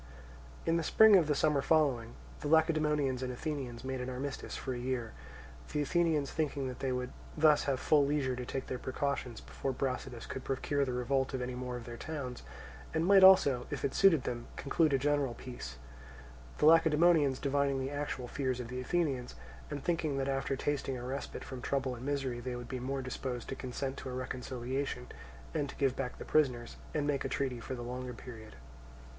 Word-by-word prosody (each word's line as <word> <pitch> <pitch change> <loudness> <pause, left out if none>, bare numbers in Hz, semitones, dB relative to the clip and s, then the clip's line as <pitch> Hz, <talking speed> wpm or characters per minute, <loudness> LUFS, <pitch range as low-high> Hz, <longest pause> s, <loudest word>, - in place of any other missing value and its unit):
In 165 - +3
the 165 - 0
spring 220 +5 +7
of 170 -5 +5
the 150 - +2
summer 150 -1 +3
following, 135 -7 +2 0.2
the - - -4
Lacedaemonians 150 -4 +3
and 130 -1 -2
Athenians 130 -3 -4
made 130 -1 -3
an 125 - -3
armistice 135 +2 -4
for 130 - -3
a 120 - -4
year; 125 -2 -2 0.6
the 150 - +1
Athenians 155 -2 +1
thinking 145 -4 -1
that 125 -1 -6
they 135 - -1
would 125 0 -2 0.3
thus 155 -1 +5
have 135 -2 0
full 150 +1 +4
leisure 140 -2 +1
to 125 - -4
take 130 +2 -4
their 130 - -4
precautions 130 -3 -2
before 135 - -4
Brasidas 130 -2 -3
could 130 - -6
procure 140 +1 0
the 130 - -2
revolt 130 +2 0
of 130 - -2
any 125 0 -3
more 125 0 -4
of 120 - -8
their 120 -1 -7
towns, 140 -5 -5 0.5
and 160 +1 +2
might 195 0 +7
also, 140 -10 +7
if - - -3
it 135 - -1
suited 170 -9 +5
them, 120 -1 -4
conclude 155 +2 +2
a 135 - +4
general 140 -2 +1
peace; 115 - -8 0.8
the - - +2
Lacedaemonians 160 -3 +5
divining 140 -1 +1
the 130 +1 -3
actual 145 -3 -3
fears 130 -1 -1
of 120 -1 -5
the 125 +1 -4
Athenians, 135 - -1 0.3
and 145 -2 -5
thinking 160 -5 0
that 135 0 0
after 135 0 0
once - - -8
tasting 140 -2 -1
a 120 - -7
respite 135 +2 -5
from 130 -2 -7
trouble 135 -1 -1
and 120 0 -8
misery 135 -3 -1
they 125 +1 -4
would 120 0 -6
be 130 - -4
more 135 +2 -3
disposed 130 -1 -4
to - - -3
consent 130 +1 -4
to - - -6
a - - -5
reconciliation, 130 +1 -3 0.5
and 145 -3 -1
to - - -8
give 135 -2 +1
back 125 -2 -4
the - - -8
prisoners, 125 -6 +1
and 150 -2 -1
make 145 -2 0
a 135 - -2
treaty 130 -2 -1
for 130 +3 -5
the 120 - -6
longer 125 +1 -5
period. 110 - -10
135 Hz, 205 wpm, -32 LUFS, 125-145 Hz, 0.8 s, spring